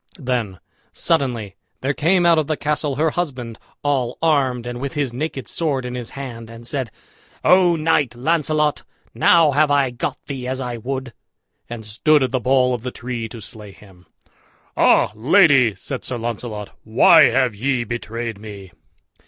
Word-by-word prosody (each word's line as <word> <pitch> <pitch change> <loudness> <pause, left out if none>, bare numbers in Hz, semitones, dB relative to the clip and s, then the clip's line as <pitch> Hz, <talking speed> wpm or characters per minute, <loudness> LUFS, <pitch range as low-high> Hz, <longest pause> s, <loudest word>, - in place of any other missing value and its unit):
Then 125 - -3 0.3
suddenly 120 - -1 0.2
there 135 +2 0
came 175 +5 +2
out 170 -2 +5
of 155 - -1
the 155 - -1
castle 150 -1 -1
her 155 +2 +1
husband, 130 -10 -4 0.2
all 130 -4 0
armed, 135 -7 +1
and 120 0 -6
with 140 -1 -4
his 140 -5 -2
naked 135 -3 -4
sword 140 -5 -1
in 125 - -5
his 125 -2 -5
hand, 115 -4 -7
and 115 +1 -11
said, 130 -1 -3 0.5
"O 180 -2 +5
Knight 155 -6 +1
Launcelot, 150 +2 0 0.3
now 165 -4 +4
have 150 +2 +3
I 140 -3 +2
got 120 - -4
thee 130 -3 -5
as 130 +1 -3
I 125 -2 -4
would," 130 +1 -5 0.6
and 115 -2 -7
stood 145 +7 +2
at 130 - -1
the 130 - 0
boll 125 +1 +2
of 120 - -3
the 125 - -4
tree 120 -2 -5
to 115 - -9
slay 105 0 -9
him. 95 -3 -19 0.7
"Ah, - - +4
lady!" 135 - +4
said 130 +7 -6
Sir 125 - -3
Launcelot, 115 -3 -5
"why 110 +1 +6
have 125 0 +2
ye 125 +3 -1
betrayed 115 -1 -5
me?" 100 -3 -10
125 Hz, 170 wpm, -20 LUFS, 115-145 Hz, 0.7 s, why